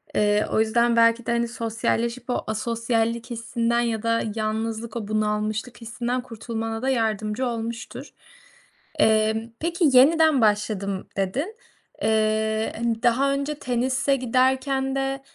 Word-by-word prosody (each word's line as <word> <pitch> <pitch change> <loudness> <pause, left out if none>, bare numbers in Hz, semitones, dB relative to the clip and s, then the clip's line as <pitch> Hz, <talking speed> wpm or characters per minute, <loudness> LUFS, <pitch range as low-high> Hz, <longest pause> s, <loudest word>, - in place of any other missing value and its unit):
Eee, 210 0 +3
o - - +2
yüzden 235 +2 +2
belki 230 0 +4
de, - - -1
hani, 235 0 +1
sosyalleşip 230 +1 -2
o - - -1
asosyallik 230 +2 -1
hissinden 235 0 -1
ya 230 -2 -1
da 230 0 +1
yalnızlık, 220 +1 -3
o 220 -3 -4
bunalmışlık 215 +2 -2
hissinden 240 +2 -3
kurtulmana 225 -1 -5
da 265 - 0
yardımcı 220 -1 0
olmuştur. 230 0 -5 0.9
Emm, 220 +1 +2
peki, 335 -1 +1
"Yeniden 310 +1 +5
başladım." 205 -2 0
dedin. 265 - -2 0.5
Eee, 220 0 +1
hani, 230 -1 -2
daha 270 +4 +3
önce 280 +2 -2
tenise 255 +2 0
giderken 265 +2 +1
de 270 0 -2
230 Hz, 125 wpm, -24 LUFS, 220-255 Hz, 0.9 s, Yeniden